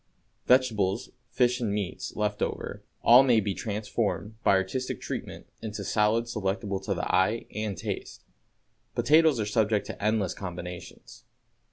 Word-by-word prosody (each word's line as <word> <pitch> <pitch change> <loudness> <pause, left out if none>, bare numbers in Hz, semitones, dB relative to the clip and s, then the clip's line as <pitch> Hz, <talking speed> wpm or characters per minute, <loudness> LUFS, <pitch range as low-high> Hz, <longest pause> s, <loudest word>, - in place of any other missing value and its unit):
Vegetables, 115 -4 +2 0.2
fish 125 0 +2
and 110 -4 0
meats, 100 -3 -4
"left 105 -1 -1
over," - - -3 0.2
all 120 +2 +9
may 125 -4 +4
be 100 -2 -1
transformed, 105 +1 -2
by - - +5
artistic 95 +7 -1
treatment, - - -6 0.2
into 105 -2 -5
salads 110 +4 +1
delectable 100 -1 -2
to 95 +1 -2
the 90 - -2
eye 95 +5 +2
and 105 -3 -3
taste. - - -5 0.7
Potatoes 155 -3 +4
are 105 - 0
subject 105 0 +1
to - - -7
endless 105 -4 +1
combinations. 90 -1 -8
105 Hz, 140 wpm, -28 LUFS, 100-115 Hz, 0.7 s, all